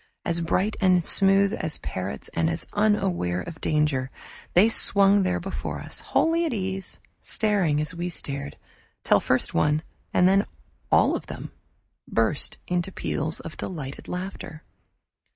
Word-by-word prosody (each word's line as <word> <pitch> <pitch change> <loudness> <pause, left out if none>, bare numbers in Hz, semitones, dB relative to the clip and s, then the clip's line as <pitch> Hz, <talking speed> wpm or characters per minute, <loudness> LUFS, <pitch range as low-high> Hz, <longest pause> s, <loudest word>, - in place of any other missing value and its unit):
As 170 0 +1
bright 190 +5 0
and 180 -3 +4
smooth 195 +1 +4
as 155 - -1
parrots 95 -7 -5
and 80 -1 +1
as 80 - -3
unaware 195 - +1
of 160 - -9
danger, 150 -4 +1 0.5
they 190 +5 +7
swung 200 -2 +5
there 180 -1 0
before 190 +2 -5
us, - - -2
wholly 330 +1 +1
at 320 -6 -1
ease, 190 -1 -4 0.2
staring 195 -9 0
as 150 +3 +2
we 175 +1 -3
stared, 140 -4 -4 0.5
till - - +4
first - - 0
one, 150 - +2 0.3
and 180 - +4
then 195 +1 +3 0.4
all - - +4
of - - -6
them - - -7 0.6
burst 115 +6 0
into 180 +1 -1
peals 160 -3 -1
of 165 - -9
delighted 145 -6 -6
laughter. 180 -4 -6
180 Hz, 145 wpm, -25 LUFS, 150-195 Hz, 0.6 s, they